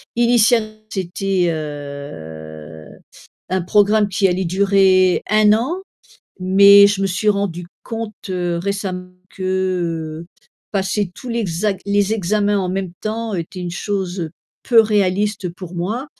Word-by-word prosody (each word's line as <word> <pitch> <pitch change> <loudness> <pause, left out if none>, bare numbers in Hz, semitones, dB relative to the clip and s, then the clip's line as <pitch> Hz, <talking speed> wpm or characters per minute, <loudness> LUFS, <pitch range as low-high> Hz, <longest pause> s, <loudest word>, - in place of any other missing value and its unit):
initialement 235 -2 +3 0.2
c'était, 190 -1 -1
heu, 80 - -8 0.6
un 185 -1 0
programme 205 +3 +3
qui 195 +1 +2
allait 180 +1 -1
durer 190 0 +3
1 215 0 +5
an, 270 - -1 0.6
mais 200 +2 +7
je 200 -1 0
me - - +2
suis 190 +3 -1
rendue 200 -4 -1 0.2
compte 225 -1 -5 0.2
récemment 180 +1 -3 0.2
que, 175 -4 -2
heu, - - -14 0.5
passer 195 -1 -1
tous 255 - -10
l'exac 205 -4 -1
les 200 +1 +1
examens 205 +1 +1
en 185 -2 -1
même 190 -1 -3
temps 220 0 -3
était 170 +1 -5
une 175 -1 -4
chose, 190 -1 -3
heu, 165 -2 -4 0.3
peu 235 -3 +5
réaliste 205 -2 0
pour 180 0 -10
moi 215 +11 -3
190 Hz, 130 wpm, -19 LUFS, 175-210 Hz, 0.6 s, mais